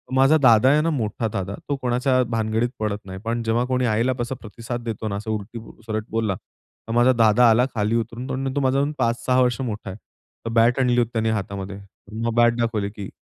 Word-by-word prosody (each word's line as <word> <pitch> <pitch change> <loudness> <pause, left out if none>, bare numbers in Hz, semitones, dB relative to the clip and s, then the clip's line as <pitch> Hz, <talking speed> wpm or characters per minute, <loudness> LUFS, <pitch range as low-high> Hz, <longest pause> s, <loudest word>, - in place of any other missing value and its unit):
माझा 135 +4 +5
दादा 120 -1 +6
आहे 150 +2 +4
ना, 165 - +1
मोठा 115 -5 -2
दादा, 100 +1 -3
तो 145 - +1
कोणाच्या 125 +1 +1
भानगडीत 115 +1 0
पडत 105 -1 -1
नाही, 95 0 -8
पण 115 +1 -1
जेव्हा 115 +2 +1
कोणी 125 0 0
आईला 115 +3 +1
तसा 120 +2 -2
प्रतिसाद 115 +2 -6
देतो 110 -1 -4
ना, 100 - -3
असं 110 +2 -4
उलट-सुलट 110 0 -6
बोलला, 110 -3 -1
तर 115 - -15
माझा 120 +2 +5
दादा 115 0 +5
आला 120 +3 +4
खाली 105 +1 0
उतरून, 115 +3 -3
तो 130 - -2
न 135 0 -3
तो - - +1
माझ्याहून 135 +2 +1
5-6 120 +2 +1
वर्ष 125 0 +1
मोठा 110 -5 -4
आहे. 95 - -7 0.5
तर - - -2
बॅट 115 +2 +3
आणली 125 -2 +2
होती 120 -2 +2
त्यांनी 110 -1 0
हातामध्ये, 100 -2 -4 0.5
मग 115 - 0
बॅट 120 0 +4
दाखवली 110 -4 -1
की 100 -2 -8
115 Hz, 210 wpm, -23 LUFS, 110-125 Hz, 0.5 s, दादा